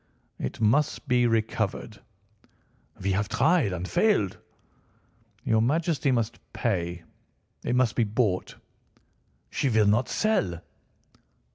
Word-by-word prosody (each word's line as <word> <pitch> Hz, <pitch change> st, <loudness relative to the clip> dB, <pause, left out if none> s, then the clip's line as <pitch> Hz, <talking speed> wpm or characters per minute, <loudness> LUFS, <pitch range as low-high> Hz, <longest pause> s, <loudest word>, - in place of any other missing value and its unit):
"It 65 Hz, -, -4 dB
must 140 Hz, +7 st, +1 dB
be 125 Hz, -2 st, +3 dB
recovered." 110 Hz, -2 st, -1 dB, 1.0 s
"We 95 Hz, +1 st, -1 dB
have 105 Hz, +2 st, 0 dB
tried 160 Hz, -, +2 dB
and 90 Hz, 0 st, -4 dB
failed." 105 Hz, -, +1 dB, 1.0 s
"Your 110 Hz, -1 st, +2 dB
Majesty 150 Hz, +2 st, +1 dB
must 120 Hz, -1 st, -1 dB
pay. 85 Hz, -6 st, -2 dB, 0.6 s
It 120 Hz, -, 0 dB
must 125 Hz, -3 st, +2 dB
be 120 Hz, -, +3 dB
bought." 105 Hz, -3 st, -1 dB, 1.0 s
"She 140 Hz, -, 0 dB
will 110 Hz, -3 st, +3 dB
not 105 Hz, +5 st, +2 dB
sell." 100 Hz, -, 0 dB
110 Hz, 110 wpm, -26 LUFS, 100-130 Hz, 1.0 s, be